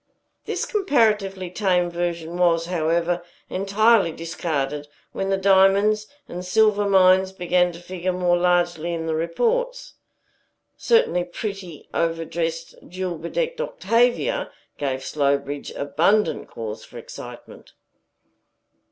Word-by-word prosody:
This - - -2
comparatively 210 - +1
tame 180 -3 +1
version 170 -1 -3
was, 170 -2 +2
however, 170 0 0 0.3
entirely 200 0 +3
discarded 150 -3 -3 0.2
when 195 - -3
the 195 - +2
diamonds 200 +2 +4 0.2
and 180 +1 -6
silver 205 +1 +3
mines 190 0 +5
began 180 -1 +1
to 170 - -11
figure 185 +1 -3
more 180 -1 +2
largely 175 -1 +1
in 165 -1 -4
the 160 - -1
reports. 475 - -1 0.8
Certainly, 460 - +2
pretty, 185 -2 -7
overdressed, 165 0 -2
jewel 180 -2 -4
bedecked - - -2
Octavia 245 - +1 0.3
gave 135 -2 -2
Slowbridge 140 0 -1
abundant 165 +10 +1
cause 110 -1 -7
for - - -12
excitement. - - -11
180 Hz, 110 wpm, -23 LUFS, 165-200 Hz, 0.8 s, mines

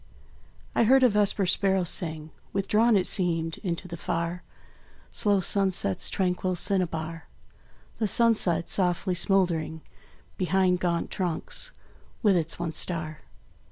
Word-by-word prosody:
I 230 - +3
heard 260 +3 +5
a 250 - +6
vesper 205 -1 +1
sparrow 190 0 +1
sing, 160 -3 -2 0.2
Withdrawn, 210 +3 +3
it 185 - +1
seemed, 165 -3 0
into 175 -1 -4
the 170 - -7
far 170 +1 -3 0.7
Slow 205 -2 +2
sunset's 190 - +1
tranquil 185 -1 -1
cinnabar; 165 -3 -2 0.7
The 220 - +1
sunset, 200 -7 +3
softly 180 0 0
smouldering 175 -4 0 0.6
Behind 185 0 +2
gaunt 170 -2 -1
trunks, 180 - 0 0.5
with 205 -3 +4
its 165 -2 -1
one 170 -2 -4
star. 155 -3 -2
180 Hz, 120 wpm, -26 LUFS, 165-195 Hz, 0.7 s, a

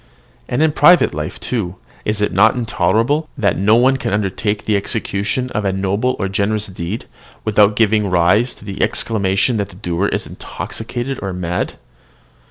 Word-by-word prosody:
And 125 +5 +1
in 160 - +3
private 175 +4 +5
life, 75 0 -5
too, 100 -7 -2 0.3
is 105 -1 -1
it - - +1
not 105 +7 +4
intolerable 125 +5 +1
that 100 -7 +1
no 105 +3 +4
one 130 +3 +4
can - - -3
undertake 105 +1 -1
the 105 - +1
execution 105 +5 -2
of 105 - -2
a 95 - +1
noble 100 +6 0
or 95 - -1
generous 105 +2 0
deed, 95 +2 -5 0.4
without 105 -1 +4
giving 105 -2 +2
rise 90 +7 +3
to - - -15
the 100 -1 -5
exclamation 105 +2 +1
that 100 -1 -2
the 90 - -14
doer 90 0 -1
is - - -2
intoxicated 125 +2 -5
or 95 -1 -3
mad? 90 -1 -2
105 Hz, 170 wpm, -18 LUFS, 95-115 Hz, 0.4 s, private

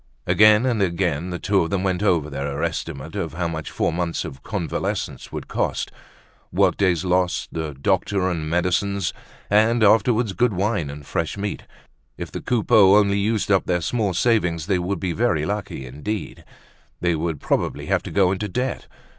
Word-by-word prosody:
Again 105 +2 +5
and 120 -5 +1
again 85 -2 0
the 90 - -3
two 100 +2 +1
of 85 - -1
them 100 -2 -1
went 95 -1 0
over 85 -8 +2
their 70 +1 -3
estimate 80 -2 -4
of 80 -1 -3
how 85 0 -1
much 80 -2 -5
four - - -1
months 85 -1 -2
of 65 0 -8
convalescence 95 -7 -3
would - - -6
cost; - - -2 0.6
workdays 95 -1 +2
lost, 90 0 +1
the 80 -3 -4
doctor 95 +5 0
and 85 -3 -1
the 75 - -4
medicines, 90 +3 0 0.3
and 110 +3 +3
afterward 110 0 +3
good 120 -3 +3
wine 95 -5 0
and 70 0 -9
fresh 80 +7 -2
meat. 100 0 -4 0.5
If - - -6
the - - -5
Coupeaus 105 -4 +5
only 100 -1 +2
used 105 0 0
up 95 - +3
their 90 -1 +1
small 105 -1 -1
savings, 90 -7 +1
they 95 -1 +1
would 90 +1 -2
be 90 0 -2
very 95 -8 +1
lucky 100 -8 -4
indeed. 75 - -5 0.5
They 85 -1 +1
would 80 -1 -2
probably - - -1
have - - +1
to - - -8
go 95 -2 +3
into 100 +2 -2
debt. 125 +6 -3
95 Hz, 180 wpm, -22 LUFS, 85-105 Hz, 0.6 s, Again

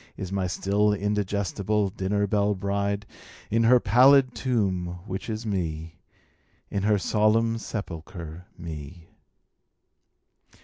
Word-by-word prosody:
Is 95 -1 -5
n^y 95 -2 -1
still 105 +3 +1
indigestible 100 0 -1
dinner 100 +2 0
belle 100 0 +1
bride, 100 +1 -1 0.5
In 115 +1 +3
her 125 +2 +6
pallid 130 +4 +5
tomb, 95 -8 -1
which 95 +2 -5
is 110 +1 -4
Me, 80 -5 -3 0.7
In 100 - -1
her 105 +1 +3
solemn 115 +3 +2
sepulcher, 85 -4 -7
Me. 80 0 -8
100 Hz, 105 wpm, -26 LUFS, 90-105 Hz, 0.7 s, her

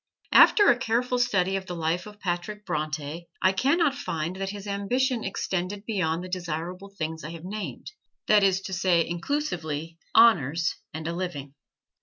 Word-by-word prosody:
After 410 - +7
a 245 - 0
careful 245 +2 0
study 190 -5 +2
of 190 -1 -7
the 180 - -4
life 170 +3 -1
of 210 0 -12
Patrick 205 +3 -3
Bronte 155 +1 -3
I 185 - +6
can 265 - +2
not 325 -5 +3
find 170 - -3
that 195 0 -3
his 200 0 -7
ambition 230 +5 0
extended 195 +1 -3
beyond 180 -6 -1
the - - -6
desirable 180 +1 -4
things 160 -5 -5
I 155 - -5
have 165 0 -9
named 210 +2 -6 0.3
that 210 -1 +5
is 190 -1 +3
to 190 0 -6
say, 175 -2 +2
inclusively, 165 - -3 0.2
honors 175 - +5 0.2
and 160 0 -5
a 170 - -2
living. 165 -6 -5
185 Hz, 170 wpm, -26 LUFS, 165-210 Hz, 0.3 s, After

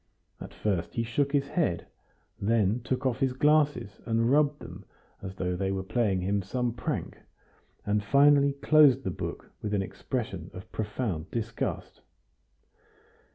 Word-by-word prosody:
At - - -8
first 95 -5 -2
he 115 - 0
shook 135 +5 0
his 140 -1 +1
head, 150 - 0 0.6
then 110 +1 +2
took 130 +3 -2
off 125 -3 0
his 130 -1 +1
glasses 145 -6 +2
and 115 +1 +2
rubbed 145 0 +3
them - - -10 0.4
as 95 0 -7
though 90 -1 -2
they 95 +1 -1
were 95 -1 -2
playing 100 -2 0
him 100 +2 0
some 120 +5 -2
prank, 115 - -4 0.7
and 105 0 +1
finally 140 +4 +5
closed 140 -2 +5
the 95 - -2
book - - -6
with 105 -1 -2
an 100 - +1
expression 95 - -4
of 90 - -10
profound 105 -6 -3
disgust. 115 -1 -4
115 Hz, 150 wpm, -28 LUFS, 95-140 Hz, 0.7 s, finally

